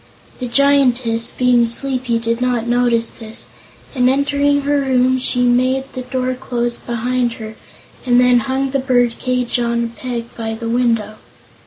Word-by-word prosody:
The 250 Hz, -, -3 dB
Giantess, 250 Hz, -3 st, +2 dB
being 245 Hz, -2 st, +2 dB
sleepy, 255 Hz, 0 st, 0 dB
did 230 Hz, +1 st, -2 dB
not 245 Hz, -2 st, 0 dB
notice 240 Hz, -1 st, +1 dB
this, 225 Hz, -2 st, -10 dB, 0.5 s
and 250 Hz, -2 st, +2 dB
entering 285 Hz, +1 st, +1 dB
her 285 Hz, +1 st, +1 dB
room 260 Hz, -1 st, +2 dB
she 250 Hz, -1 st, +2 dB
made 255 Hz, +2 st, +2 dB
the 255 Hz, -, -5 dB
door 255 Hz, 0 st, -2 dB
close 240 Hz, -2 st, -3 dB
behind 240 Hz, +1 st, -2 dB
her 220 Hz, -1 st, -8 dB, 0.5 s
and 245 Hz, -1 st, +3 dB
then 250 Hz, -1 st, +5 dB
hung 265 Hz, +2 st, -2 dB
the 275 Hz, -, 0 dB
bird 245 Hz, -3 st, +1 dB
cage 250 Hz, -1 st, -1 dB
on 235 Hz, 0 st, 0 dB
a -, -, -2 dB
peg 235 Hz, 0 st, -6 dB
by 225 Hz, -1 st, -4 dB
the 230 Hz, 0 st, -5 dB
window. 230 Hz, -3 st, 0 dB
245 Hz, 160 wpm, -17 LUFS, 235-260 Hz, 0.5 s, then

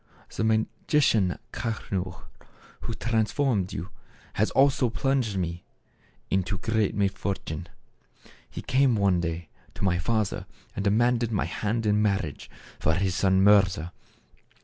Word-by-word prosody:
The -, -, -1 dB
magician 110 Hz, -, +2 dB, 0.2 s
Kaschnur 95 Hz, -6 st, -4 dB, 0.6 s
who 115 Hz, -, -4 dB
transformed 110 Hz, -2 st, 0 dB
you, 90 Hz, +2 st, -5 dB, 0.4 s
has 110 Hz, -, +1 dB
also 135 Hz, -2 st, +3 dB
plunged 125 Hz, -3 st, 0 dB
me 85 Hz, -1 st, -3 dB, 0.7 s
into 95 Hz, +1 st, 0 dB
greater 110 Hz, 0 st, 0 dB
misfortune. 95 Hz, -4 st, -2 dB, 0.4 s
" -, -, -26 dB
He -, -, -7 dB
came 130 Hz, -2 st, +3 dB
one 100 Hz, -4 st, +2 dB
day 85 Hz, 0 st, -4 dB, 0.3 s
to -, -, -6 dB
my 90 Hz, -2 st, +2 dB
father 110 Hz, +1 st, -1 dB, 0.3 s
and 100 Hz, -, -2 dB
demanded 120 Hz, +3 st, +2 dB
my 105 Hz, -, 0 dB
hand 105 Hz, +5 st, -2 dB
in 105 Hz, 0 st, +3 dB
marriage 95 Hz, -8 st, -1 dB, 0.3 s
for 80 Hz, -, +2 dB
his 95 Hz, 0 st, 0 dB
son 95 Hz, 0 st, +3 dB
Mirza. 95 Hz, -4 st, +4 dB
100 Hz, 125 wpm, -26 LUFS, 95-115 Hz, 0.7 s, Mirza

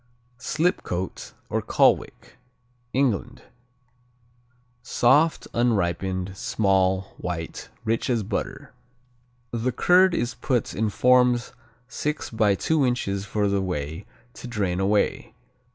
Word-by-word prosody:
Slipcote, 140 Hz, -, -2 dB
or -, -, -1 dB
Colwick -, -, +1 dB, 0.5 s
England 125 Hz, -2 st, -1 dB, 1.4 s
Soft; 135 Hz, +6 st, +2 dB
unripened; 95 Hz, -4 st, 0 dB
small; 95 Hz, -1 st, +1 dB
white; 85 Hz, -2 st, -5 dB
rich 115 Hz, +3 st, -1 dB
as 115 Hz, -4 st, +1 dB
butter. -, -, -5 dB, 0.8 s
The 120 Hz, +2 st, -1 dB
curd 180 Hz, +7 st, +4 dB
is 120 Hz, +1 st, -1 dB
put 125 Hz, -4 st, -1 dB
in 110 Hz, 0 st, 0 dB
forms 125 Hz, +1 st, +3 dB, 0.3 s
six 150 Hz, +4 st, -3 dB
by 110 Hz, -3 st, +2 dB
two 155 Hz, +7 st, +1 dB
inches 100 Hz, -6 st, -1 dB
for 105 Hz, 0 st, 0 dB
the 100 Hz, 0 st, +1 dB
whey 85 Hz, +1 st, -4 dB, 0.3 s
to 125 Hz, -, -9 dB
drain 100 Hz, -6 st, -1 dB
away. 100 Hz, +2 st, 0 dB
110 Hz, 105 wpm, -24 LUFS, 95-125 Hz, 1.4 s, curd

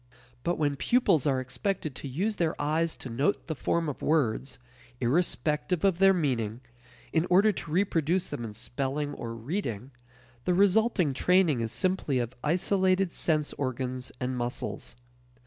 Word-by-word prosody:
But 175 Hz, +5 st, -1 dB
when 145 Hz, -2 st, 0 dB
pupils 170 Hz, -, +3 dB
are 135 Hz, -2 st, +2 dB
expected 130 Hz, +5 st, -3 dB
to 140 Hz, -, -7 dB
use 195 Hz, +11 st, -1 dB
their 165 Hz, -2 st, 0 dB
eyes 160 Hz, +3 st, 0 dB
to -, -, -8 dB
note 140 Hz, -, 0 dB
the 160 Hz, -, -3 dB
form 165 Hz, +3 st, 0 dB
of 145 Hz, -, -5 dB
words, 135 Hz, -4 st, 0 dB, 0.4 s
irrespective 155 Hz, +4 st, 0 dB
of 185 Hz, -3 st, +2 dB
their 195 Hz, 0 st, +7 dB
meaning, 125 Hz, -, -1 dB, 0.5 s
in 165 Hz, +2 st, +2 dB
order 195 Hz, +4 st, +5 dB
to 170 Hz, -5 st, -7 dB
reproduce 175 Hz, 0 st, +1 dB
them 120 Hz, -, -5 dB
in 110 Hz, -2 st, -6 dB
spelling 135 Hz, +5 st, -3 dB
or 115 Hz, -4 st, -6 dB
reading, 125 Hz, -, -4 dB, 0.5 s
the 180 Hz, -, +2 dB
resulting 200 Hz, -, +3 dB
training 170 Hz, -3 st, +3 dB
is 115 Hz, -1 st, -2 dB
simply 185 Hz, -6 st, 0 dB
of 120 Hz, 0 st, -2 dB
isolated 185 Hz, +2 st, +2 dB
sense 155 Hz, -3 st, 0 dB
organs 130 Hz, -1 st, -3 dB
and 125 Hz, 0 st, -2 dB
muscles. 120 Hz, 0 st, -4 dB
150 Hz, 150 wpm, -28 LUFS, 130-180 Hz, 0.5 s, their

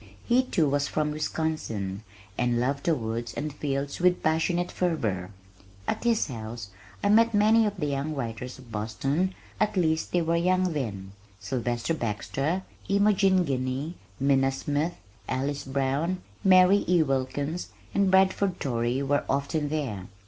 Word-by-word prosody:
He, 245 Hz, +2 st, +4 dB
too, 180 Hz, -, +1 dB
was 140 Hz, 0 st, +1 dB
from 150 Hz, -1 st, 0 dB
Wisconsin, 150 Hz, -11 st, -2 dB, 0.3 s
and 120 Hz, +1 st, +1 dB
loved 135 Hz, +3 st, -1 dB
the 165 Hz, -, +3 dB
woods 115 Hz, -1 st, -4 dB
and 150 Hz, 0 st, -3 dB
fields 140 Hz, -1 st, -3 dB
with 180 Hz, 0 st, +3 dB
passionate 165 Hz, +3 st, +1 dB
fervor. 110 Hz, -, -1 dB, 0.6 s
At -, -, -2 dB
his 230 Hz, -2 st, +3 dB
house 110 Hz, -5 st, -7 dB, 0.3 s
I 200 Hz, -, +3 dB
met 225 Hz, +1 st, +5 dB
many 215 Hz, +2 st, +5 dB
of 205 Hz, -1 st, -4 dB
the 155 Hz, -, -1 dB
young 145 Hz, +2 st, -2 dB
writers 125 Hz, -1 st, -5 dB
of 125 Hz, -3 st, -15 dB
Boston 135 Hz, -, -1 dB, 0.2 s
at 210 Hz, -2 st, +1 dB
least 160 Hz, -3 st, +1 dB
they 175 Hz, -1 st, +2 dB
were 165 Hz, +1 st, +1 dB
young 180 Hz, +1 st, +2 dB
then 100 Hz, -9 st, -4 dB, 0.3 s
Sylvester 120 Hz, +2 st, -1 dB
Baxter, 140 Hz, -, -2 dB, 0.3 s
Imogene 195 Hz, -2 st, +4 dB
Guiney, 135 Hz, +3 st, -2 dB, 0.3 s
Minna 135 Hz, -1 st, +3 dB
Smith, 145 Hz, +5 st, -1 dB, 0.3 s
Alice 140 Hz, +2 st, -2 dB
Brown, 140 Hz, +7 st, -1 dB, 0.2 s
Mary 185 Hz, +1 st, +6 dB
E. 175 Hz, -2 st, +4 dB
Wilkins, 140 Hz, +3 st, -2 dB, 0.2 s
and 200 Hz, -1 st, +3 dB
Bradford 190 Hz, 0 st, +3 dB
Torrey 120 Hz, +1 st, 0 dB
were 145 Hz, +1 st, +1 dB
often 140 Hz, +2 st, 0 dB
there. 130 Hz, -12 st, -3 dB
145 Hz, 145 wpm, -27 LUFS, 130-180 Hz, 0.6 s, Mary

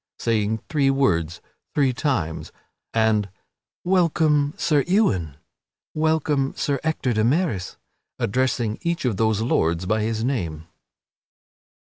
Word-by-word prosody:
saying 110 Hz, -1 st, 0 dB
three 145 Hz, -4 st, +2 dB
words 85 Hz, -, +1 dB, 0.3 s
three 135 Hz, -3 st, +3 dB
times; 120 Hz, -, -2 dB, 0.4 s
and 110 Hz, -3 st, +2 dB, 0.5 s
"Welcome, 160 Hz, -5 st, +2 dB
Sir 150 Hz, -4 st, +2 dB
Ewain!" 100 Hz, -, +1 dB, 0.6 s
"Welcome, 155 Hz, -3 st, 0 dB
Sir 140 Hz, -2 st, 0 dB
Ector 155 Hz, -6 st, 0 dB
de 110 Hz, 0 st, +1 dB
Maris!" 130 Hz, -, 0 dB, 0.4 s
addressing 120 Hz, -1 st, 0 dB
each 170 Hz, -4 st, -2 dB
of 115 Hz, -6 st, 0 dB
those 110 Hz, -1 st, +1 dB
lords 85 Hz, -6 st, +1 dB
by 110 Hz, +3 st, +1 dB
his 110 Hz, +1 st, -1 dB
name. 85 Hz, -, -2 dB
125 Hz, 110 wpm, -23 LUFS, 105-150 Hz, 0.6 s, three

